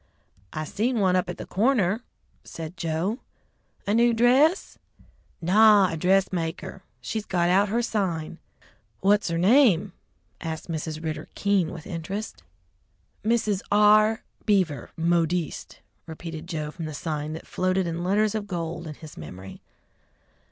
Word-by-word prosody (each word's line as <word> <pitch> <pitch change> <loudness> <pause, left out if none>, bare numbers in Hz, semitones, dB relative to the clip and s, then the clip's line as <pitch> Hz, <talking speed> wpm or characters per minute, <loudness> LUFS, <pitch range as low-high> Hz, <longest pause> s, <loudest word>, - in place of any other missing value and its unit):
"I 155 - -4
seen 230 - -1
one 185 -2 +3
up 180 -1 0
at 180 - -5
the - - -7
corner!" 215 -1 +1 0.4
said 165 +1 -8
Joe. 170 - -2 0.7
"A 205 - 0
new 235 +1 +4
dress?" 265 - +3 0.6
"Naw, 205 +1 +6
a - - -3
dressmaker. 180 0 0 0.2
She's 220 -1 -3
got 175 -2 +1
out 195 +3 +3
her 235 +3 0
sign." 175 -8 -2 0.6
"What's 205 +2 +3
her 165 - -1
name?" 200 - +4 0.5
asked 160 0 -5
Mrs. 155 0 -4
Ridder, 155 -1 -4
keen 200 -5 +1
with 160 -3 -9
interest. 195 +6 -5 0.8
"Mrs. 215 -3 +1
R. 215 +1 +5 0.2
Beaver, 180 - +1
Modiste," 170 0 -1 0.3
repeated 160 0 -7
Joe 155 -4 -4
from 165 0 -7
the 155 -1 -6
sign 150 0 -3
that 160 - -8
floated 185 0 0
in 170 0 -3
letters 205 +3 +2
of 215 -2 -3
gold 170 -2 -4
in 150 - -7
his 155 0 -12
memory. 90 +5 -10
180 Hz, 135 wpm, -25 LUFS, 160-210 Hz, 0.8 s, Naw